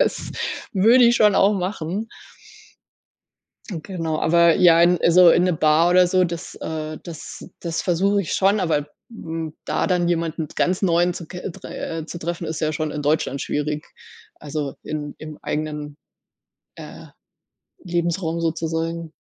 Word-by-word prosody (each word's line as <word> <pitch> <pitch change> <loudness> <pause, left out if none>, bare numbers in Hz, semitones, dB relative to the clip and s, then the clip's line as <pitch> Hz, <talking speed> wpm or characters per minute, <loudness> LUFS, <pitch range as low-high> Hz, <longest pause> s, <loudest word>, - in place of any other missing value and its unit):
Das - - 0 0.4
würde 230 +6 +5
ich 235 0 +5
schon 210 -2 +4
auch 200 +2 +5
machen. 190 +2 -3 1.6
Hm, 170 -6 -5
genau, 165 -5 -3
aber 170 0 +4
ja, 170 -2 +6
in 175 0 +4
so 180 0 +8
in 175 - +4
'ne 180 -2 +2
Bar 155 +2 +3
oder 180 0 +5
so, 185 +1 +3
das, 170 0 -5
äh, 155 -1 -5
das 165 -4 -9 0.2
das 165 -2 -3
versuche 195 +3 +1
ich 180 - -4
schon, 200 +2 +3
aber, 150 -5 0 0.2
hm, 165 -8 -6
da - - 0
dann 180 -2 +1
jemanden 165 -2 -1
ganz 180 +2 +1
Neuen 175 -1 +2
zu 170 -2 -8
ke 180 +1 -8 0.2
äh, 165 -1 -5
zu 170 - -7
treffen, 170 +1 -4
ist 160 0 -4
ja 155 - +1
schon 155 0 -3
in 150 - -4
Deutschland 145 -2 0
schwierig. 150 +1 -2 0.5
Also, 145 -2 -5
in 150 -1 -5
im 155 -1 -9
eigenen, 150 -1 -4 0.8
äh, - - -10 0.8
Lebensraum 170 -1 -1
sozusagen. 165 0 -2
165 Hz, 155 wpm, -22 LUFS, 155-180 Hz, 1.6 s, so